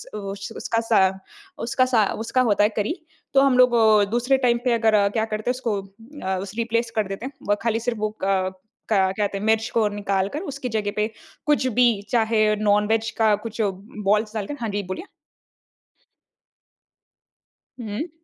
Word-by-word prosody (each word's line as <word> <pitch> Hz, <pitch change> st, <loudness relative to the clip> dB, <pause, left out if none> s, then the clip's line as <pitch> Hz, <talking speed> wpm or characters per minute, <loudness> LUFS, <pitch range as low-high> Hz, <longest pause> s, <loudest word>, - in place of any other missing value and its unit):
उस 200 Hz, 0 st, -6 dB
उसका 230 Hz, -, -1 dB
सा 225 Hz, -, +5 dB, 0.7 s
उसका 255 Hz, +2 st, +2 dB
सा 235 Hz, -5 st, +3 dB, 0.2 s
उसका 255 Hz, +3 st, +2 dB
होता 205 Hz, -4 st, +3 dB
है 210 Hz, -, +4 dB
करी। 215 Hz, +10 st, 0 dB, 0.4 s
तो 270 Hz, -, +6 dB
हम 270 Hz, -2 st, +4 dB
लोग 250 Hz, -1 st, +7 dB
वो 215 Hz, -3 st, +5 dB
दूसरे 245 Hz, +3 st, +2 dB
टाइम 240 Hz, -1 st, +4 dB
पे 250 Hz, -, +3 dB
अगर 220 Hz, -3 st, +3 dB
क्या 220 Hz, -, +2 dB
करते 215 Hz, +1 st, -3 dB
हैं -, -, +3 dB
उसको 225 Hz, -6 st, -2 dB
अ, 195 Hz, 0 st, -6 dB, 0.2 s
रिप्लेस 230 Hz, 0 st, 0 dB
कर 215 Hz, -2 st, +1 dB
देते 195 Hz, +5 st, -6 dB
हैं। -, -, -8 dB, 0.2 s
वो 205 Hz, -, +3 dB
खाली 225 Hz, -1 st, +1 dB
सिर्फ़ 230 Hz, -1 st, -3 dB
वो 215 Hz, 0 st, -2 dB
क 190 Hz, -1 st, +1 dB, 0.4 s
क्या 190 Hz, -3 st, +3 dB
कहते 200 Hz, 0 st, -2 dB
हैं 195 Hz, -, -5 dB
मिर्च 220 Hz, 0 st, +2 dB
को 225 Hz, -2 st, +3 dB
निकाल 200 Hz, -2 st, -1 dB
कर 295 Hz, -, -2 dB
उसकी 265 Hz, -2 st, -5 dB
जगह 215 Hz, -2 st, -1 dB
पे 210 Hz, 0 st, +1 dB, 0.4 s
कुछ 295 Hz, -3 st, +2 dB
भी 250 Hz, -, +6 dB, 0.3 s
चाहे 225 Hz, -2 st, +2 dB, 0.2 s
नॉन-वेज 210 Hz, +2 st, +2 dB
का 220 Hz, -2 st, +4 dB
कुछ 220 Hz, +2 st, -5 dB
बोल्स 210 Hz, +1 st, -1 dB
डालकर 215 Hz, +7 st, -4 dB
हाँ, 230 Hz, -, -2 dB
जी 205 Hz, 0 st, -2 dB
बोलिए। 185 Hz, -, -5 dB, 2.8 s
हुँ। 225 Hz, +8 st, -4 dB
220 Hz, 175 wpm, -23 LUFS, 205-235 Hz, 2.8 s, लोग